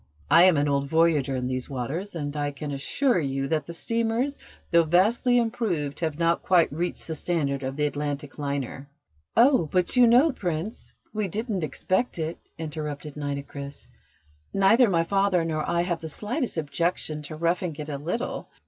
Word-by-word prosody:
I 170 +2 +8
am 185 -5 +5
an 145 +1 +2
old 140 -1 +1
voyager 155 -4 +3
in 125 -1 -2
these 130 +1 -3
waters, 145 - -4
and 145 -2 -4
I 145 -1 -1
can 145 +1 -6
assure 210 - +1
you 135 -2 -1
that 155 -3 0
the 170 - -6
steamers, 230 +8 -1 0.3
though 170 -1 +6
vastly 215 +10 +3
improved, 215 - -1
have 160 -3 -2
not 170 0 +2
quite 175 -5 +3
reached 175 +4 -3
the 160 - -3
standard 145 -4 -1
of 135 0 -4
the 150 0 +1
Atlantic 145 0 -4
liner." 140 -1 -4 0.5
"Oh, 240 - +5
but 180 +4 +1
you 250 -1 +7
know, 255 +7 +6
Prince, 180 -2 -4 0.2
we 215 -2 -1
didn't 210 -1 -2
expect 185 - -1
it," 160 0 -3 0.2
interrupted 150 -2 -5
Nitocris. 140 -1 -6 0.7
"Neither 215 +5 +5
my 165 -3 +2
father 195 -2 +2
nor 155 -2 -2
I 170 0 +2
have 175 -1 -1
the 160 - -5
slightest 230 - -3
objection 160 0 -1
to 150 +1 -7
roughing 170 +1 0
it 150 0 -6
a 145 -2 -4
little. 180 - -3
165 Hz, 175 wpm, -26 LUFS, 145-195 Hz, 0.7 s, I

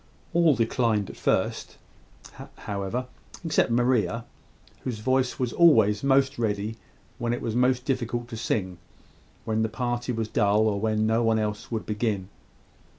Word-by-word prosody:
All 165 -4 +4
declined 115 -3 0
at - - -14
first, - - -1 0.8
however, 100 +5 -4 0.4
except 155 -6 +2
Maria, 115 -2 +1 0.5
whose 125 -4 -4
voice 130 +3 0
was 125 -2 -2
always 110 -12 +5
most 135 -1 +2
ready 105 -1 -1 0.4
when 120 0 -1
it 120 - -3
was 115 - -2
most 125 0 +2
difficult 120 -3 -2
to 115 - -6
sing 95 -5 -2 0.7
when 110 0 0
the 110 - 0
party 120 +1 -2
was 115 -2 -2
dull, 105 0 +2
or 100 -2 0
when 110 0 +1
no 110 +1 +2
one 115 -1 +2
else 105 0 -3
would 110 -2 -3
begin. 105 -3 -2
115 Hz, 150 wpm, -26 LUFS, 105-125 Hz, 0.8 s, always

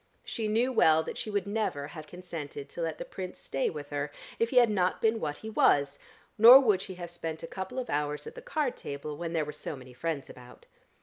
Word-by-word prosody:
She 220 -2 -3
knew 230 +5 +2
well 160 -8 +5
that - - -6
she - - -4
would 205 -2 -1
never 200 -9 -2
have 155 -2 -9
consented 165 -6 -7
to - - -6
let 160 -2 -2
the - - -6
Prince 185 -1 -7
stay 135 - -1
with 145 -2 -7
her, 145 0 -2 0.3
if 230 - +2
he 260 - -5
had 240 -3 +7
not 185 -3 +1
been 225 0 +2
what 150 -4 -3
he 220 - -8
was, 140 -8 +3 0.4
nor 240 +4 +11
would 210 -8 +3
she 190 -1 -6
have 175 -1 -7
spent 165 -2 -5
a - - -4
couple 190 +9 -6
of 255 - -2
hours 150 0 -2
at - - -8
the - - -10
card 310 - -1
table 140 +1 -6
when 165 +2 -5
there 160 -2 +1
were 150 - -6
so - - -6
many 130 -1 -12
friends 145 +2 -3
about. 125 -1 -14
170 Hz, 240 wpm, -29 LUFS, 150-215 Hz, 0.4 s, nor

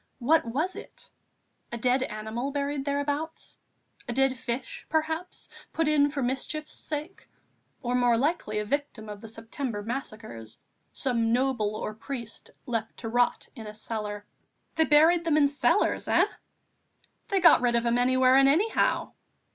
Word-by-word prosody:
What 295 +4 +3
was 300 +11 -1
it? - - -11 0.6
a 235 - -3
dead 250 +2 +2
animal 220 +2 -3
buried 280 0 -2
thereabouts, 285 +3 -3 0.5
a - - -1
dead 270 +1 +2
fish, 255 +1 -5
perhaps, 320 +3 -2 0.3
put 325 -1 +1
in 290 -1 +4
for 280 -2 -3
mischief's 270 +5 -3
sake, 305 +5 -6 0.5
or 245 0 -1
more 245 -2 +3
likely 275 -5 0
a 210 - -1
victim 275 -3 -3
of 205 -1 -8
the 225 - -9
September 225 0 -5
massacres, 215 - -6 0.3
some 230 -3 0
noble 240 -4 +1
or 215 - -4
priest, 235 0 -7 0.2
left 230 -2 -3
to 225 - -5
rot 245 +1 +1
in 225 -4 -8
a 210 - -8
cellar. 210 -1 -5 0.5
"They 320 - +3
buried 320 +3 +5
them 320 -3 +2
in 290 -2 +5
cellars, 285 +1 +1
eh?" - - +4 1.0
"They 390 - +1
got 335 -7 +7
rid 240 -1 +2
of 235 0 +1
'em 235 +1 +2
anywhere 255 +1 +4
and 270 0 +6
anyhow." 385 +11 +2
255 Hz, 155 wpm, -27 LUFS, 230-290 Hz, 1.0 s, got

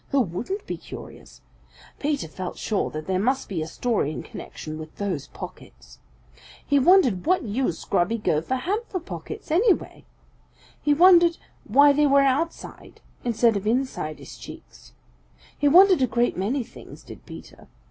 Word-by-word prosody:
Who 275 - +3
wouldn't 245 - -4
be - - -4
curious? - - -12 0.6
Peter 290 - -1
felt 180 +3 -7
sure 210 - -1
that 155 0 -6
there 185 -1 0
must 260 +6 0
be 180 -5 -3
a 155 - -4
story 215 -4 -1
in - - -6
connection 155 0 -8
with 155 0 -10
those 180 -9 -3
pockets. - - -12 0.7
He 285 -1 +3
wondered 275 - +4
what 365 +1 +3
use 220 -5 -2
Grubby 180 +7 +1
Gopher 165 +2 0
had 365 +12 -1
for 370 - -3
pockets, 395 +2 -8
anyway. 385 +4 +1 0.8
He 295 -1 +2
wondered 345 0 +6 0.3
why 285 +6 +6
they 295 +1 +3
were 280 0 +5
outside 275 +5 -2 0.2
instead 235 -1 +2
of 200 +1 -3
inside 230 - -1
his - - -12
cheeks. - - -13 0.6
He 290 - +1
wondered 365 +2 +6
a 255 - +3
great 240 +1 0
many 235 +8 -1
things, - - -14
did - - -12
Peter. - - -12
255 Hz, 155 wpm, -24 LUFS, 190-300 Hz, 0.8 s, wondered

